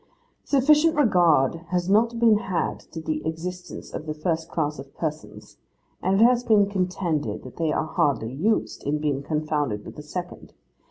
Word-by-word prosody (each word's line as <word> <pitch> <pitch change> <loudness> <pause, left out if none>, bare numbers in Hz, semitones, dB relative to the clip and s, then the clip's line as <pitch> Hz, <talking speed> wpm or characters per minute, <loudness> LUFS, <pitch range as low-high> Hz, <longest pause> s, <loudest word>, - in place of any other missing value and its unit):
sufficient 300 +4 +4
regard 175 - +4
has 180 0 0
not 230 +4 +3
been 225 -3 +5
had 190 -6 -2
to 165 - -10
the 155 -1 -3
existence 175 +3 -6
of 155 - -6
the 155 - -3
first 160 +1 -2
class 150 -3 -2
of 135 0 -11
persons; 155 -2 -6 0.4
and 190 +2 +2
it - - +7
has 245 0 +4
been 210 -4 +4
contended 180 - -2
that 130 - -11
they 160 -2 0
are 155 - 0
hardly 130 -6 0
used, 205 +11 0
in 145 +2 0
being 145 -2 -1
confounded 150 -8 -2
with - - -9
the 150 - -8
second. 175 +4 -7
165 Hz, 170 wpm, -24 LUFS, 150-200 Hz, 0.4 s, it